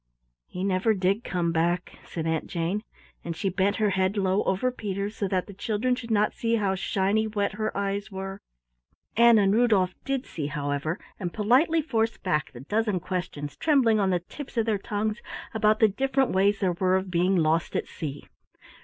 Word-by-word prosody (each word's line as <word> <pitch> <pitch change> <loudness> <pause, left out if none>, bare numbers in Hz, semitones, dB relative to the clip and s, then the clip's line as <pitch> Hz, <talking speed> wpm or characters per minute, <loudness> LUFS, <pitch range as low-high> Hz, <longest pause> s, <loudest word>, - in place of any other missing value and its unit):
"He 180 - -5
never 195 +3 +2
did 195 +4 +1
come 175 -2 -1
back," 170 +2 -1
said 165 -2 -5
Aunt 160 -1 -1
Jane, 175 +4 -1 0.4
and 170 -1 -4
she 195 - -1
bent 190 +2 +1
her 210 -2 +1
head 190 +2 +1
low 195 0 +2
over 195 +7 +1
Peter's 205 -2 -4
so 200 - -1
that 185 -1 0
the 200 - -10
children 220 +4 0
should 245 -2 -5
not 210 -1 +2
see 230 0 0
how 200 -4 +1
shiny 195 +3 +1
wet 205 -2 -1
her 215 +1 -3
eyes 200 +1 -2
were. 195 +1 -6 0.7
Ann 235 0 +7
and 200 -1 +4
Rudolf 210 -6 +3
did 270 -1 -2
see, 150 -3 -4
however, 145 +2 -2 0.2
and 180 -3 -3
politely 265 - +3
forced 225 -6 -1
back 150 -6 0
the 120 - -10
dozen 210 - 0
questions 175 -5 -4
trembling 260 -9 +3
on 195 -2 +2
the 180 -2 +1
tips 265 - -10
of 225 - +2
their 215 -3 0
tongues 210 +2 -2 0.3
about 215 -1 +3
the 220 - +6
different 270 +4 +1
ways 200 +2 +2
there 185 -2 +2
were 185 +1 +2
of 190 0 -1
being 180 +2 +2
lost 165 -1 +1
at - - -1
sea. 145 -3 -6
200 Hz, 190 wpm, -26 LUFS, 180-220 Hz, 0.7 s, Ann